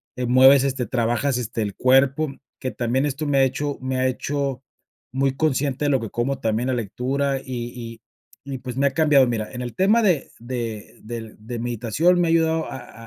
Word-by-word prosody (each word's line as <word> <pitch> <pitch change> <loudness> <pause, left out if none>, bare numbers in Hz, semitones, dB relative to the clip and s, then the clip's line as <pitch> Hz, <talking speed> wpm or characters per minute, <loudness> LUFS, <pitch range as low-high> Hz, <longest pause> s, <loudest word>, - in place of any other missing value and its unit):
eh, 125 - -2
mueves, 130 +2 +6
este, 130 -3 -1
trabajas, 120 +4 0
este, 115 -1 -3
el 100 -1 -4
cuerpo, 135 +3 +3 0.3
que 130 - -3
también 125 +3 0
esto 145 +2 -3
me 140 -1 +2
ha - - +6
hecho 145 +2 -1
me 130 0 -2
ha 130 - +2
hecho 135 0 -2 0.5
muy 135 +1 0
consciente 145 -1 0
de - - +2
lo 135 - +3
que 115 -3 -5
como. 130 +3 -2
También 115 +1 -1
la 130 - +1
lectura, 130 +5 -1
y 120 -2 -6
y - - -59 0.5
y, 135 -2 -4
pues, 125 0 -7
me 140 - +2
ha 140 - +3
cambiado. 150 -4 +4
Mira, 110 -3 -3
en 125 -1 -6
el 120 - -6
tema 205 +5 +4
de 175 -9 +2
de 115 -3 -5
del 115 -1 -7
de 115 +3 -6
meditación, 120 - +1
me 175 - +2
ha - - 0
ayudado 160 -1 +1
a 120 -2 -10
130 Hz, 205 wpm, -23 LUFS, 120-140 Hz, 0.5 s, mueves